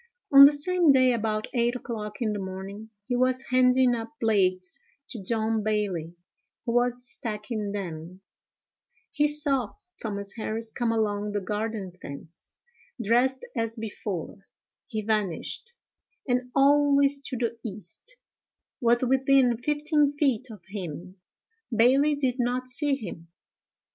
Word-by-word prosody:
On 275 0 +12
the 285 - +8
same 335 +2 +3
day, 255 -2 +5
about 215 -2 -1
eight 240 0 +1
o'clock 220 -2 -5
in 215 -2 0
the 205 - -3
morning, 195 +3 -7 0.2
he 250 - 0
was 255 +1 +1
handing 255 0 +4
up 230 +1 -4
blades 185 -5 +1 0.3
to 230 -5 -7
John 220 +2 0
Bailey, 200 -6 -2 0.5
who 235 - -1
was 245 0 +1
stacking 215 -3 -4
them; 180 -2 -6 0.9
he 295 0 +2
saw 285 -6 +1 0.3
Thomas 200 -3 -4
Harris 220 0 -4
come 240 -1 -1
along 210 -2 -1
the 205 - 0
garden 210 0 -3
fence, 155 +4 -9 0.4
dressed 245 +4 +1
as 230 -1 -2
before; 210 -5 -5 0.5
he 220 -5 -4
vanished, 215 - -2 0.5
and 250 0 0
always 280 0 +4
to 255 - -4
the 235 -1 -2
east; 225 - -9 0.6
was 240 +1 +3
within 265 -1 +3
fifteen 295 +1 +1
feet 265 -4 0
of 215 -3 -11
him; 185 -1 -7 0.5
Bailey 265 +6 +4
did 260 -2 -1
not 250 +1 -1
see 280 +2 +2
him. 175 -9 -8
230 Hz, 130 wpm, -26 LUFS, 210-260 Hz, 0.9 s, On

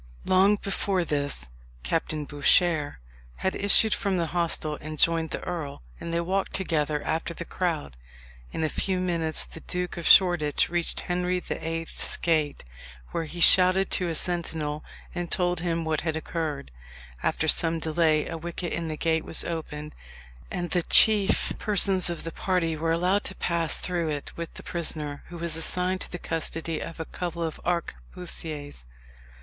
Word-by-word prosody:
Long 190 +3 +4
before 195 -2 -1
this 145 - -1 0.4
Captain 150 - -2
Bouchier 150 +1 +2 0.4
had 190 - -1
issued 210 +2 +5
from 195 -2 -1
the 170 - +1
hostel 165 -3 0
and 155 +1 -7
joined 165 +1 +3
the - - -5
earl, 155 - -5 0.2
and 170 - -5
they 170 - 0
walked 190 +3 -1
together 150 -5 -1
after 165 +1 -2
the 170 - -6
crowd. 165 - -3 0.6
In 160 - -3
a - - +2
few 190 +3 -1
minutes 170 -3 +2
the - - -9
Duke 180 +2 -4
of 170 - -3
Shoreditch 175 -6 +5
reached 175 -1 -2
Henry 180 0 -1
the - - -6
Eighth's 165 0 -1
Gate, 155 -4 0 0.5
where 165 - -2
he 170 +3 -8
shouted 185 +2 +6
to 180 -2 0
a 165 - -2
sentinel, 160 -3 -2 0.3
and 175 -1 -4
told 175 -1 +1
him 165 -1 -2
what 160 -1 -1
had 160 -1 -2
occurred. 155 - -4 0.5
After - - 0
some 165 0 +4
delay 160 -1 +1
a 165 - -5
wicket 170 +1 -5
in 170 -1 -2
the 155 -1 -4
gate 160 0 0
was - - 0
opened, 150 -2 -5 0.6
and 175 -2 -4
the 175 - +2
chief 205 +3 +5
persons 195 -3 +4
of 170 - -4
the 165 - -5
party 170 -2 -1
were 165 +1 -1
allowed 180 +5 +1
to 190 - -5
pass 170 -3 0
through 175 -3 -1
it 145 -2 -5
with 170 -1 -7
the - - -9
prisoner, 155 -4 -3
who 175 - -9
was 170 -1 -2
assigned 180 +3 +1
to - - 0
the 175 - -4
custody 165 -1 -2
of 165 - -7
a 160 - -3
couple 170 0 -4
of 160 -1 -4
arquebusiers. 150 - -3
165 Hz, 170 wpm, -26 LUFS, 155-180 Hz, 0.6 s, shouted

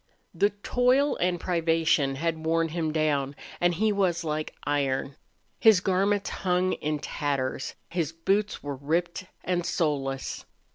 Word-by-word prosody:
The 205 - +3
toil 250 +7 +2
and 175 0 0
privation 165 -5 +2
had 160 +2 -2
worn 165 0 +1
him 160 -1 -1
down 145 -3 0 0.2
and 175 0 +2
he 215 +4 +2
was 185 -4 +1
like 155 -1 -3
iron. 140 -1 0 0.4
His 220 -4 +7
garments 195 +2 +1
hung 185 0 +1
in 150 0 -2
tatters; 140 -3 -2
his 165 -3 -2
boots 195 +6 0
were 145 -2 -4
ripped 170 +6 -1 0.2
and 180 -1 0
soleless. 140 -6 -1
165 Hz, 135 wpm, -27 LUFS, 145-185 Hz, 0.4 s, His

